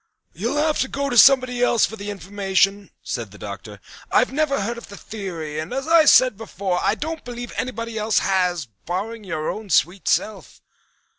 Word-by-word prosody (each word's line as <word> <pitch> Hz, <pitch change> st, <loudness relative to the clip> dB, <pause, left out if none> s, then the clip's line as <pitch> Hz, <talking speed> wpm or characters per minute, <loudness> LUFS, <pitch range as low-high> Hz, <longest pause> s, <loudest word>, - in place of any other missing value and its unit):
"You'll 295 Hz, -, -2 dB
have 305 Hz, 0 st, +1 dB
to 265 Hz, -, +1 dB
go 280 Hz, 0 st, -3 dB
to -, -, -1 dB
somebody 255 Hz, -2 st, +5 dB
else 240 Hz, -2 st, +4 dB
for 220 Hz, -, -7 dB
the 205 Hz, -1 st, -7 dB
information," 195 Hz, +1 st, 0 dB
said -, -, -4 dB
the -, -, -14 dB
Doctor. -, -, -8 dB, 0.3 s
"I -, -, +5 dB
never 285 Hz, 0 st, 0 dB
heard 235 Hz, +4 st, -3 dB
of -, -, -13 dB
the 200 Hz, -, -10 dB
theory 170 Hz, -8 st, -6 dB
and, 155 Hz, -, -5 dB
as 270 Hz, +3 st, -3 dB
I 330 Hz, -1 st, +6 dB
said 255 Hz, -6 st, +6 dB
before, 195 Hz, -4 st, -3 dB
I -, -, +1 dB
don't 320 Hz, +1 st, -5 dB
believe 245 Hz, 0 st, -7 dB
anybody 230 Hz, -2 st, -4 dB
else 215 Hz, +1 st, 0 dB
has, 180 Hz, -5 st, +1 dB, 0.2 s
barring 210 Hz, +6 st, -4 dB
your 160 Hz, -5 st, -4 dB
own 215 Hz, -1 st, -8 dB
sweet 180 Hz, +4 st, +1 dB
self." 195 Hz, -, -1 dB
215 Hz, 190 wpm, -22 LUFS, 190-255 Hz, 0.3 s, I